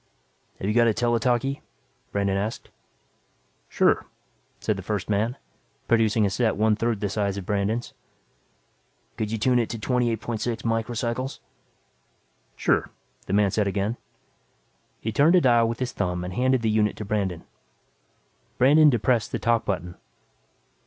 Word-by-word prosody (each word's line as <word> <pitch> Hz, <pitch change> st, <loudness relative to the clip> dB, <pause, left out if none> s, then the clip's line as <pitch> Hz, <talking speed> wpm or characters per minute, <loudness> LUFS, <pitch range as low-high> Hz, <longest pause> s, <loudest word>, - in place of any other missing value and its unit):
"Have 95 Hz, -, -3 dB
you 105 Hz, -, +1 dB
got 120 Hz, 0 st, +4 dB
a 110 Hz, -, +2 dB
tele 120 Hz, -1 st, +1 dB
talkie?" 125 Hz, +4 st, 0 dB, 0.5 s
Brandon 100 Hz, -1 st, 0 dB
asked. 105 Hz, +3 st, -4 dB, 1.0 s
"Sure," -, -, +2 dB, 0.5 s
said 110 Hz, -, -1 dB
the 95 Hz, -, -6 dB
first 105 Hz, +1 st, -3 dB
man, 110 Hz, +5 st, 0 dB, 0.5 s
producing 110 Hz, -2 st, +3 dB
a -, -, +2 dB
set 110 Hz, +3 st, +1 dB
one 110 Hz, 0 st, +3 dB
third 115 Hz, -1 st, -1 dB
the 105 Hz, -, 0 dB
size 100 Hz, -1 st, -1 dB
of 95 Hz, -, -6 dB
Brandon's. 105 Hz, +4 st, -1 dB, 1.2 s
"Could 110 Hz, -1 st, -3 dB
you 115 Hz, -, -1 dB
tune 125 Hz, +3 st, +2 dB
it 115 Hz, -, -1 dB
to 115 Hz, -, -4 dB
28.6 120 Hz, -1 st, -1 dB
microcycles?" 120 Hz, +3 st, -2 dB, 1.2 s
"Sure," -, -, +1 dB, 0.4 s
the -, -, -3 dB
man 100 Hz, -1 st, +3 dB
said 105 Hz, 0 st, +1 dB
again. 100 Hz, +3 st, -1 dB, 1.0 s
He 110 Hz, -, -3 dB
turned 150 Hz, +10 st, +4 dB
a 180 Hz, -, +5 dB
dial 120 Hz, -4 st, +4 dB
with 115 Hz, -, -3 dB
his 125 Hz, -1 st, -3 dB
thumb 90 Hz, -3 st, -2 dB
and 90 Hz, 0 st, -5 dB
handed 130 Hz, +2 st, +1 dB
the 110 Hz, -, +2 dB
unit 105 Hz, -1 st, +1 dB
to 105 Hz, -, -5 dB
Brandon. 100 Hz, -5 st, -2 dB, 1.1 s
Brandon 150 Hz, +4 st, +6 dB
depressed 120 Hz, -2 st, +1 dB
the -, -, -1 dB
"talk" 115 Hz, -1 st, +1 dB
button. 90 Hz, -2 st, -3 dB
110 Hz, 150 wpm, -25 LUFS, 100-120 Hz, 1.2 s, Brandon